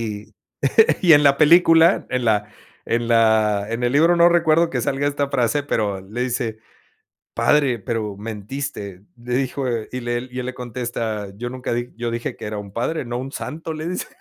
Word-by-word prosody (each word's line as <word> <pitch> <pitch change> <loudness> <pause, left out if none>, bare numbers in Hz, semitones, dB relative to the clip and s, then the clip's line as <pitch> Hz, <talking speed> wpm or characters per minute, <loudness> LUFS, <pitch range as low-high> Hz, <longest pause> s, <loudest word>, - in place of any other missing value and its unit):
Y 105 -2 -6 0.7
y 170 -3 +6
en 145 0 +7
la 140 -1 +5
película, 165 +2 +5
en 125 -1 -1
la 105 -1 +1 0.4
en 115 0 -1
la 110 -3 +3
en 120 +2 -2
el 120 - +1
libro, 165 +4 +4
no 170 0 +6
recuerdo 170 -1 +3
que 125 - -1
salga 135 +4 -1
esta 145 -1 -1
frase, 125 +4 +1
pero, 105 -8 -1
le 105 +6 -5
dice: 120 -3 -2 0.8
"padre, 140 -5 +2
pero 105 -1 -4
mentiste", 105 -2 -6
le 120 +1 -5
dijo 135 +1 -1 0.3
y 125 - -5
le 120 +1 -3
y 125 - -7
él 125 - -5
le 130 - -5
contesta, 115 -4 -4
yo 120 +3 -4
nunca 125 -1 -5
di 120 +1 -3
yo 120 0 -3
dije 115 0 -4
que - - -9
era 105 0 -4
un 100 -1 -9
padre, 130 +7 -2
no 120 0 -4
un 135 +2 -6
santo, 160 +1 -6
le 155 +2 -5
dice. 180 - -3
120 Hz, 195 wpm, -21 LUFS, 110-145 Hz, 0.8 s, en